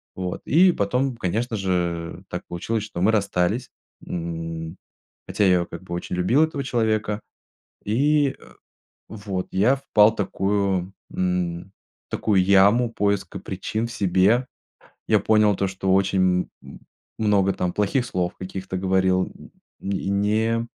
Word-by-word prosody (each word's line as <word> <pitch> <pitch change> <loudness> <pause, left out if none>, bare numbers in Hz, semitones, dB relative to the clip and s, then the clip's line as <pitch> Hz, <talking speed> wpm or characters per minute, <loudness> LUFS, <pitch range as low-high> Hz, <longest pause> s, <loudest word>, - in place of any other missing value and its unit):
Вот 90 -1 -4
и 180 +3 +5
потом, 125 +6 0
конечно 115 +3 -2
же, 85 -4 -2
так - - -5
получилось, 105 +5 -2
что 95 -5 -7
мы 105 +4 +4
расстались, 100 +3 0 0.4
м. 80 -1 -5 0.5
Хотя - - -2
я 95 - +5
её 85 -1 +1
как 85 +1 -9
бы 90 - -10
очень 90 - -4
любил 115 - +3
этого 145 -3 -3
человека. 110 -4 0 0.6
И, 140 +6 +2
э, - - -17 0.6
вот 100 -3 -5
я 110 +9 +3
впал 110 -5 +4
такую, 100 -2 -1 0.2
м, 90 0 -2 0.4
такую 100 -4 +2
яму 100 +5 +4
поиска 100 -2 -1
причин 110 +4 -3
в - - -9
себе. 105 +5 +2 0.6
Я - - +4
понял 105 -1 +3
то, 100 - 0
что 95 0 -1
очень 95 -2 +2
м - - -12 0.4
много 100 -3 +2
там 90 -2 -2
плохих 115 +5 0
слов 90 -1 -2
каких-то 95 0 -6
говорил, 95 0 +2
м, - - -15 0.4
и 95 -1 -2
не 110 +3 +1
100 Hz, 140 wpm, -23 LUFS, 90-110 Hz, 0.6 s, и